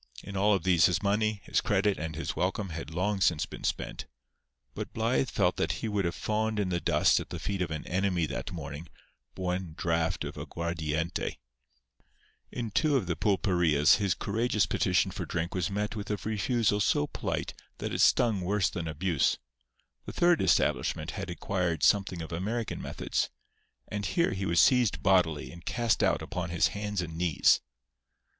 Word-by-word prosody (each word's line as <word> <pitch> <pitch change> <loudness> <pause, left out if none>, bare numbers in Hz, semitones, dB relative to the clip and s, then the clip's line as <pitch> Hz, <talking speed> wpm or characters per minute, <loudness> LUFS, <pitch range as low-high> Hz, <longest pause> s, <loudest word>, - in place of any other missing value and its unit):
In 100 - -8
all 100 +2 +4
of 95 - -2
these 90 -2 +5
his 90 +1 -1
money, 105 0 +1
his - - 0
credit 100 0 +1
and 80 0 -4
his 85 - -4
welcome 95 +2 -1
had 80 -3 -6
long 95 +5 -1
since 80 -3 +3
been - - -10
spent; - - -3 0.7
but - - -6
Blythe 115 +3 +1
felt 90 -5 +1
that - - 0
he - - -4
would 105 -3 0
have 85 - -1
fawned 110 0 -1
in 100 -3 0
the 85 -1 0
dust - - +3
at - - -7
the - - -5
feet 100 -2 -3
of 90 - -1
an 80 -2 -5
enemy 90 -2 0
that 80 - -5
morning 75 -1 -7 0.5
for 95 - -6
one 90 -2 -2
draught 85 0 0
of - - -6
aguardiente. 85 0 -3 1.1
In 115 -3 -4
two 150 +5 +3
of 120 - -1
the 85 -1 -1
pulperias 90 -7 +3
his 100 -4 +1
courageous 110 -1 0
petition 95 +1 +1
for 90 -2 -5
drink 85 +1 -2
was 90 -3 -1
met 105 +2 -2
with 105 -1 -5
a 105 - 0
refusal 110 0 +1
so 80 -6 +2
polite - - -3 0.2
that - - -4
it - - 0
stung 110 -6 +4
worse 95 +1 +1
than 85 -2 -4
abuse. 80 -1 +1 0.7
The - - -5
third 175 -1 +3
establishment - - +1
had - - -5
acquired 85 -6 -2
something 95 -4 +2
of 80 - -9
American 105 +7 -3
methods; - - -2 0.6
and 105 -1 -4
here 170 - +1
he 95 0 -2
was 85 0 +2
seized 120 - +4
bodily 90 -6 +2
and 85 0 -12
cast 120 +2 0
out - - +2
upon 90 -1 -4
his 85 0 +2
hands 105 -2 -3
and 80 -1 -7
knees. 85 -3 +3
95 Hz, 180 wpm, -29 LUFS, 85-105 Hz, 1.1 s, these